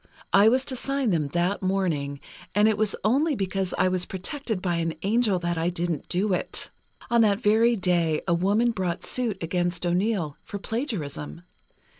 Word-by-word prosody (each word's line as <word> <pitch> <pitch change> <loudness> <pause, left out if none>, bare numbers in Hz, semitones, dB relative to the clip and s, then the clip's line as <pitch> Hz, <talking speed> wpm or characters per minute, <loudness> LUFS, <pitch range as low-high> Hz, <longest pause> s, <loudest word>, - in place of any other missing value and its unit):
I 200 +3 +7
was 260 +3 +2
to 265 - -3
sign 275 -2 0
them 155 -4 +1
that 175 +6 0
morning, 165 -8 -1 0.3
and 210 +1 +5
it 220 - +3
was 210 -1 +1
only 280 +8 +2
because 195 -2 -2
I - - +3
was 185 -1 -1
protected 220 - -3
by 175 -2 -1
an 165 -1 -1
angel 210 -1 +2
that 175 -1 -2
I 165 +2 +1
didn't 170 -3 -3
do 190 +2 +1
it. 180 - -1 0.4
On 235 -1 +5
that 205 -2 +3
very 230 +1 +4
day, 175 -5 +1
a 170 - +3
woman 205 +7 +2
brought 185 -5 -3
suit 235 -6 0
against 175 +1 -1
O'Neill, 175 -3 0
for 205 - -7
plagiarism. 150 - -4
190 Hz, 175 wpm, -25 LUFS, 175-220 Hz, 0.4 s, I